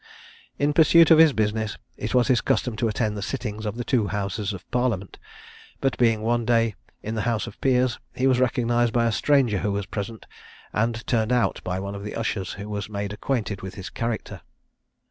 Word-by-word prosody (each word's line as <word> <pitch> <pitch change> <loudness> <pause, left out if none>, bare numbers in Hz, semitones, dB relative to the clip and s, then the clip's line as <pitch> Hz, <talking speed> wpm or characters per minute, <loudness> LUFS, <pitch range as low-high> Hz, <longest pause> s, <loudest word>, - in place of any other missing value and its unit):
In 145 +1 +1
pursuit 165 +1 +6
of 160 - +8
his 160 -2 +8
business, 110 -2 -1 0.2
it 110 - -3
was 125 -1 +4
his 125 -4 +3
custom 125 -3 0
to 115 - +1
attend 110 -1 -1
the 100 - -4
sittings 110 -1 -4
of 105 - -3
the 120 - -2
two 120 -5 +1
Houses 100 +1 -2
of 95 -3 -9
Parliament; 120 -6 -1 0.6
but 135 -1 0
being 115 -3 +3
one 120 +1 +1
day 115 -1 +2 0.3
in 110 - -4
the 110 - -1
House 115 -2 0
of - - -11
Peers, 125 -2 +2 0.2
he 130 - 0
was 130 -2 +4
recognised 120 -2 +1
by 120 -1 +2
a 115 - +2
stranger 120 -2 +2
who 105 - -1
was 100 -1 -2
present, 110 +3 -6 0.5
and 115 +2 -1
turned 115 -1 +1
out 125 -1 +1
by 90 +1 -2
one 100 +1 -5
of 100 0 -7
the 105 - -6
ushers, 105 -5 -2
who 100 +1 -7
was 105 -1 -4
made 100 -1 -4
acquainted 105 -3 -2
with 95 0 -7
his 95 - -7
character. 115 -1 -4
110 Hz, 205 wpm, -24 LUFS, 105-125 Hz, 0.6 s, of